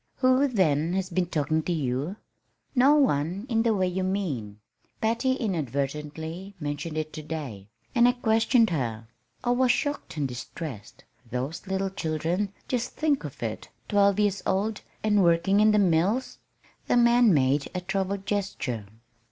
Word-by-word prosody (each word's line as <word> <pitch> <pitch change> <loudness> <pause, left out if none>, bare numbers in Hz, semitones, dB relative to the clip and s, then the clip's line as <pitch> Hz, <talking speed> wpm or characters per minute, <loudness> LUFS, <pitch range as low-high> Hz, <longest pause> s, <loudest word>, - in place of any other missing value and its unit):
"Who, 255 +2 +3
then, 170 - +1
has 190 0 -2
been 180 0 0
talking 155 -1 0
to 175 - -3
you?" 145 +2 -1 0.6
"No 275 +3 +5
one 185 - +1
in 225 -2 +2
the 225 -1 +2
way 185 -2 +1
you 180 +1 -2
mean. 145 - -2 0.4
Patty 235 +4 +1
inadvertently 160 - -3
mentioned 150 +1 -4
it 155 0 -3
to 155 - -6
day, 140 -11 -6 0.3
and 240 -1 +5
I 245 - +4
questioned 225 -2 +3
her. 115 -7 -2 0.4
I 245 - +1
was 250 0 +4
shocked 285 - -2
and 145 -2 0
distressed. 125 -1 -8 0.3
Those 130 - -4
little 190 0 -1
children 175 +2 -1 0.2
just 250 -1 -2
think 300 -3 +1
of - - -7
it - - -4 0.2
twelve 200 -1 +3
years 205 -2 +1
old, 210 +3 0 0.2
and 210 -2 +3
working 170 +4 +3
in 215 +1 +6
the 210 - +4
mills!" 195 +6 +1 0.5
The - - +3
man 240 -1 +5
made 140 -2 +2
a 180 - -1
troubled 195 +1 -2
gesture. 140 - -2
185 Hz, 155 wpm, -27 LUFS, 150-220 Hz, 0.6 s, in